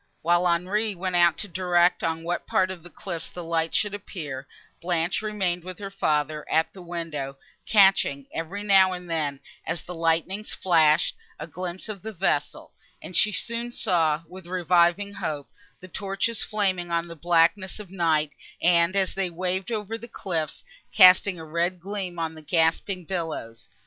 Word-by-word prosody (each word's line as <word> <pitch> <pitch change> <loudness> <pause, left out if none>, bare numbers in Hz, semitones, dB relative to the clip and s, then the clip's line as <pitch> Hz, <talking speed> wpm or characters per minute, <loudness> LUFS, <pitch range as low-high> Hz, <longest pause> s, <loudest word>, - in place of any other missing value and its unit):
While 175 +2 +3
Henri 195 +5 0
went 185 0 -2
out 170 -3 +5
to 205 - -4
direct 180 -1 +2
on 165 0 -1
what 175 +1 -3
part 185 0 +2
of 185 -3 -8
the 175 - -13
cliffs 170 -2 -6
the 175 - -8
lights 165 -1 0
should 210 -1 0
appear, 150 -9 -6 0.3
Blanche 175 +1 0
remained 190 -5 -1
with 185 0 -8
her 195 -1 -7
father, 150 -5 0
at 160 0 +2
the 190 - -11
window, 165 -6 -5 0.3
catching, 190 -9 +4
every 185 +6 -4
now 190 -2 +5
and 180 -1 -7
then, 150 -4 -2 0.2
as 170 - -3
the 180 - -7
lightnings 165 +5 -1
flashed, 160 -4 +3 0.2
a - - -6
glimpse 180 +2 -5
of 210 -4 -6
the 220 - -6
vessel; 190 +1 -1 0.3
and 180 - -9
she 210 - +4
soon 235 +3 -2
saw, 165 -8 +1
with 185 +1 -12
reviving 180 +2 +2
hope, 155 -8 -4 0.3
the 185 - -10
torches 195 +4 -2
flaming 190 -5 -1
on 170 0 0
the 170 - -9
blackness 170 +4 +2
of 200 -4 -10
night, 160 -5 +1 0.3
and, 170 +1 +3
as 195 -1 +1
they 190 -2 -1
waved 185 +3 -3
over 220 0 -3
the 235 - -9
cliffs, 170 -8 -4 0.3
casting 185 -1 +7
a 160 - -8
red 170 +3 -1
gleam 190 -1 -5
on 165 -1 -2
the 160 - -11
gasping 165 +3 +1
billows. 160 -11 -4
175 Hz, 170 wpm, -25 LUFS, 165-195 Hz, 0.3 s, casting